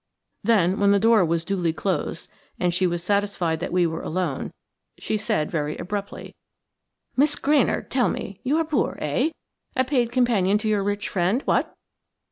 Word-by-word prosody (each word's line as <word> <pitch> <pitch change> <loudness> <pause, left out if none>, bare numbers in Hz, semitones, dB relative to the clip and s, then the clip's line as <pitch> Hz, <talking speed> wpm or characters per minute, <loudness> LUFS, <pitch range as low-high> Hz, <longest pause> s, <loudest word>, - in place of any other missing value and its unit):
Then, 195 -4 +3
when 200 0 +4
the 200 0 +5
door 225 -1 +5
was 165 0 0
duly 180 -4 0
closed, 170 -2 -2 0.3
and 175 -1 +1
she 185 +1 +2
was 175 -1 -2
satisfied 200 -4 0
that 175 - -4
we 180 0 +3
were 165 0 -2
alone, 165 -5 -2 0.5
she - - -2
said 155 -7 -1
very 150 -2 -2
abruptly: 200 +1 -5 0.8
"Miss 290 +3 +3
Granard, 290 -2 +1
tell 245 -6 +2
me! 195 +2 -5
you 280 +5 +1
are 325 - +1
poor, 305 -4 0
eh?–a 260 - -2
paid 245 -3 +1
companion 225 -6 +2
to 215 +1 -3
your 210 -2 +2
rich 205 0 -2
friend, 190 +8 0
what?" - - 0
200 Hz, 165 wpm, -24 LUFS, 175-235 Hz, 0.8 s, the